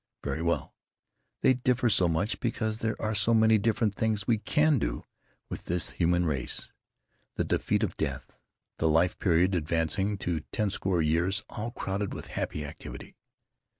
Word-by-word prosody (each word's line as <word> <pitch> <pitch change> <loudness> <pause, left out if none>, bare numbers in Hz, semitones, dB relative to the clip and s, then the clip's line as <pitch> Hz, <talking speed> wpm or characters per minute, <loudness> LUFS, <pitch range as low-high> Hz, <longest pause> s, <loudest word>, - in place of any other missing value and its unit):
Very 80 - -2
well. 85 0 -1 0.7
They 130 - +5
differ 125 -1 +1
so 90 -5 +4
much 85 +7 0
because 110 -2 -2
there 110 -1 -2
are 110 0 -1
so 110 +3 +3
many 110 0 +5
different 110 0 +1
things 105 -1 0
we 115 -1 +2
can 150 +4 +3
do - - -3 0.4
with - - -7
this 90 0 0
human 90 0 +2
race.... 70 -6 -1 0.6
The - - 0
defeat - - 0
of - - -1
death; - - -4 0.4
the 80 - +2
life 80 +3 +2
period 90 +1 +3
advancing 85 +4 0
to 85 -4 -2
ten 105 -3 0
score 95 -3 +1
years 85 +5 +1
all 110 +2 -4
crowded 100 -3 -3
with - - -8
happy 75 -1 -3
activity. 70 - -9
95 Hz, 160 wpm, -29 LUFS, 85-110 Hz, 0.7 s, They